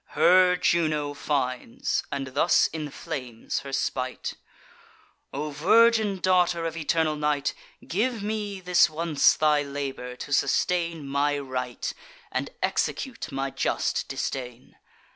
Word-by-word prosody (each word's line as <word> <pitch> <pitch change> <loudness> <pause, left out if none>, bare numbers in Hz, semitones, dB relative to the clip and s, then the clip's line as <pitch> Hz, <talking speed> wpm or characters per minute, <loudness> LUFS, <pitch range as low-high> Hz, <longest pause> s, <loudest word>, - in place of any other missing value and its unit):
Her 180 +3 +6
Juno 155 -5 +1
finds, 145 - -1
and 140 -1 -2
thus 140 - +4
inflames 135 -6 -5
her 140 - -8
spite: 130 -1 -2 1.0
"O 150 +2 -4
virgin 215 +6 +4
daughter 180 -2 +2
of 165 -1 -3
eternal 160 -1 +1
Night, 150 -1 0 0.3
Give 225 +3 -1
me 210 -2 -3
this 180 -1 +4
once 155 -1 +3
thy 150 -1 +3
labour, 140 -3 -5
to 140 +3 -6
sustain 170 0 +1
My 145 +1 +1
right, 130 -3 -4 0.4
and - - -2
execute 230 - -2
my 135 0 -2
just - - -1
disdain. 125 -2 -5
150 Hz, 115 wpm, -26 LUFS, 140-180 Hz, 1.0 s, Her